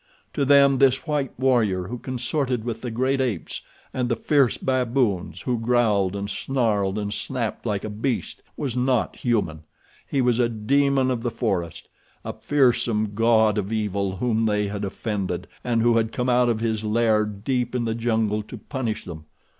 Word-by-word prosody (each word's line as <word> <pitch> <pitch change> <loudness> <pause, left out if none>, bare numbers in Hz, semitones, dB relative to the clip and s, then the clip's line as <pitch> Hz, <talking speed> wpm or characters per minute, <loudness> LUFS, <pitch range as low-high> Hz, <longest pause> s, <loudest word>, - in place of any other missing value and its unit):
To 140 - 0
them 140 -1 +5
this 130 -1 +3
white 145 -5 -2
warrior, 115 -8 +2
who 120 +3 -5
consorted 130 -1 -2
with 115 -1 -4
the 125 - -4
great 130 +4 0
apes 115 -10 -3 0.3
and 125 -1 -1
the 120 - +2
fierce 135 +1 +2
baboons, 125 -7 0
who 125 -3 -1
growled 110 -5 +2
and 100 0 -3
snarled 105 -4 0
and 105 -1 -2
snapped 120 +1 -3
like 100 -3 -1
a 110 - -4
beast, 115 +4 -3 0.2
was 135 -5 -3
not 125 -1 0
human. 105 -10 -1 0.5
He 140 - -1
was 125 -2 +2
a 120 -1 +3
demon 135 +4 +2
of 120 -2 -2
the 120 - -1
forest—a 95 -8 -5
fearsome 120 -6 +1
god 110 -1 +3
of 100 +1 -4
evil 100 -3 -1
whom 115 +1 +1
they 105 -1 +1
had 100 0 -4
offended, 100 0 -3 0.2
and 115 -2 +1
who 120 -1 +4
had 110 0 +1
come 125 +1 -1
out 125 0 +3
of 110 -1 0
his 110 -2 -1
lair 110 0 +2
deep 120 +4 -2
in 120 -2 0
the 115 - 0
jungle 110 -2 0
to 105 - -10
punish 125 -6 -4
them. 80 -4 -8
115 Hz, 175 wpm, -24 LUFS, 105-125 Hz, 0.5 s, them